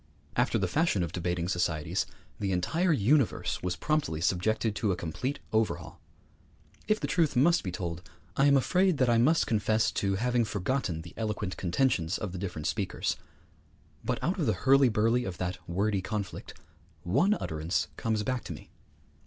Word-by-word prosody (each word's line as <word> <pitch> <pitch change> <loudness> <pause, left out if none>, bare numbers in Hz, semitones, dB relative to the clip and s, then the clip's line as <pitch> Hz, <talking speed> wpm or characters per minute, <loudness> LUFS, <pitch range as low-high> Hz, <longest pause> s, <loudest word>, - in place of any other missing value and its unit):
After - - +2
the - - 0
fashion 155 - +1
of 85 - -3
debating 90 -1 -2
societies, 85 -4 -1 0.3
the 100 -2 -1
entire 160 - +1
universe 140 0 +2
was 90 0 -1
promptly 145 - -1
subjected 105 +6 +1
to 105 - +1
a - - +1
complete 115 - -3 0.2
overhaul. 110 0 -1 0.9
If 215 0 +2
the - - -2
truth 160 -6 +1
must 165 +7 +4
be 90 - -4
told, 85 -2 -4 0.3
I 140 - +4
am 140 -1 +6
afraid 180 +5 +2
that 130 -3 +3
I 115 - +4
must 155 +8 +4
confess 110 0 +1
to 100 -1 0
having 120 +3 +1
forgotten 100 -4 -2
the 85 - -11
eloquent 105 -3 -2
contentions 90 -2 +1
of 105 - -4
the 90 - -6
different 90 -5 -5
speakers; - - -1 0.9
but - - -1
out 185 +5 0
of 150 - +1
the 110 - +3
hurly 135 -1 +6
burly 115 +3 +2
of 95 -5 -5
that 90 0 -3
wordy 100 +2 0
conflict 100 -2 -5 0.5
one 145 - +3
utterance 80 - -2
comes 110 -2 -1
back 125 +2 -2
to - - -5
me. - - -13
105 Hz, 170 wpm, -29 LUFS, 90-135 Hz, 0.9 s, am